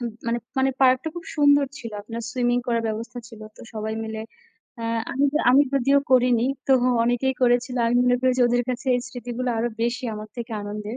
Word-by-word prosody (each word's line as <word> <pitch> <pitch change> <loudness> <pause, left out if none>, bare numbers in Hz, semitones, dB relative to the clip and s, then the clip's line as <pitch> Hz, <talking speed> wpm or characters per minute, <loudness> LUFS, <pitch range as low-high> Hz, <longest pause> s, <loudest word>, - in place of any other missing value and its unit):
হুহ, 240 -1 -3 0.2
মানে 235 +1 0 0.2
মানে 265 0 +3
পার্কটা 260 +3 +4
খুব 340 - -6
সুন্দর 285 -1 +5
ছিল। 230 - -7
আপনার 230 +2 -6
swimming 245 -1 +1
করার 235 -2 0
ব্যবস্থা 230 +3 -5
ছিল 225 -2 -13 0.2
তো - - -14
সবাই 220 0 -3
মিলে। 220 0 -5 0.6
অ্যাঁ 230 0 -2
আমি 275 +1 +1 0.3
আমি 270 +3 +6
যদিও 275 +1 +3
করিনি, 250 -2 +4 0.2
তবুও 255 -2 +3
অনেকেই 245 +3 +1
করেছিল। 245 +1 +2
আমি 235 +1 +2
মনে 245 0 +4
করি 260 0 +3
যে, - - +5
ওদের 245 0 +2
কাছে 245 +1 -5
এই 245 - +1
স্মৃতিগুলা 245 0 -4
আরও 235 +2 0
বেশি 240 +2 -1
আমার 215 0 -8
থেকে 235 -1 -6
আনন্দের। 210 +2 -6
245 Hz, 195 wpm, -24 LUFS, 230-255 Hz, 0.6 s, আমি